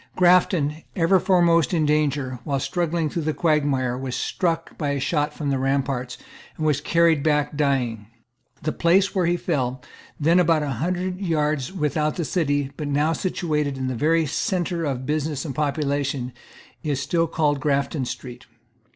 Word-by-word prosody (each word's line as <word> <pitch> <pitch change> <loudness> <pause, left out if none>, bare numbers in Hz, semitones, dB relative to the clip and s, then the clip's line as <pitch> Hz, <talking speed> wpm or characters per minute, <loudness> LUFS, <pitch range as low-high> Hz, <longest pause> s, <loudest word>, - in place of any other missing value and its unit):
Grafton, 175 -4 +3
ever 180 +2 +4
foremost 175 -2 +3
in 155 -2 +2
danger, 145 -4 0
while 140 0 -1
struggling 170 0 -1
through 165 +3 -3
the 155 0 -1
quagmire, 140 -6 +1
was 130 -1 -4
struck 165 -2 -2
by 150 -3 -2
a 140 0 -1
shot 150 +1 0
from 150 -1 -3
the 135 - 0
ramparts, 135 -2 -1 0.4
and 155 - -2
was 150 -2 +2
carried 165 -1 +3
back 150 -1 +1
dying. 125 -7 0 0.6
The 155 - 0
place 185 +5 +3
where 185 -3 +1
he 175 +1 +2
fell, 130 -8 -1 0.4
then 165 +4 +4
about 165 -3 +3
a 145 - -2
hundred 180 +2 -2
yards 155 -4 0
without 150 -3 -1
the 170 - -2
city, 145 -5 0
but 150 - -4
now 145 +3 +1
situated 150 -5 -1
in 130 -1 -2
the - - -2
very 160 +6 +2
centre 175 +2 -1
of 130 -3 -3
business 150 0 -2
and 140 - -4
population, 140 -3 -1 0.5
is 145 -5 -1
still 165 +3 0
called 150 -3 +1
Grafton 140 0 0
Street. 125 0 -8
150 Hz, 165 wpm, -23 LUFS, 140-165 Hz, 0.6 s, ever